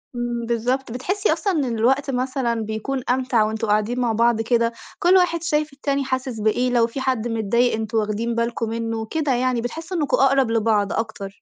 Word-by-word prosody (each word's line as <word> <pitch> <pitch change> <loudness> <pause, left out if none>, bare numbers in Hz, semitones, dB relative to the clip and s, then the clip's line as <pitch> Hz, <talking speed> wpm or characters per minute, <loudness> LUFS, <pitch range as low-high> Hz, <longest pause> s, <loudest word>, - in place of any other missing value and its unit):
امم، 240 -1 -3
بالضبط، 240 +2 -1
بتحسّي 380 - 0
أصلًا 395 -3 -1
إن 255 -7 -1
الوقت 270 +4 +2
مثلًا، 250 -2 -1
بيكون 220 +5 -3
أمتع 250 -3 +2
وأنتم 220 +1 -2
قاعدين 215 +4 +1
مع 240 -2 +1
بعض 230 0 +2
كده، 230 0 +1 0.3
كل 360 +2 +4
واحد 340 -2 +2
شايف 300 -2 0
التاني 280 0 -1
حاسِس 260 -3 -3
بإيه، 230 +4 +1
لو 235 -2 +3
في 265 +3 -6
حد 255 -3 0
متضايق 230 +2 +1
أنتم 220 0 -3
واخدين 220 +2 -1
بالكم 235 -1 -1
منه، 225 -1 -3
كده 295 +1 -1
يعني 250 -1 0
بِتحسّوا 325 +9 -5
إنكم 295 -1 +1
أقرب 270 -3 +3
لبعض 215 -3 +1
أكتر. 210 -3 -4
240 Hz, 185 wpm, -22 LUFS, 225-270 Hz, 0.3 s, كل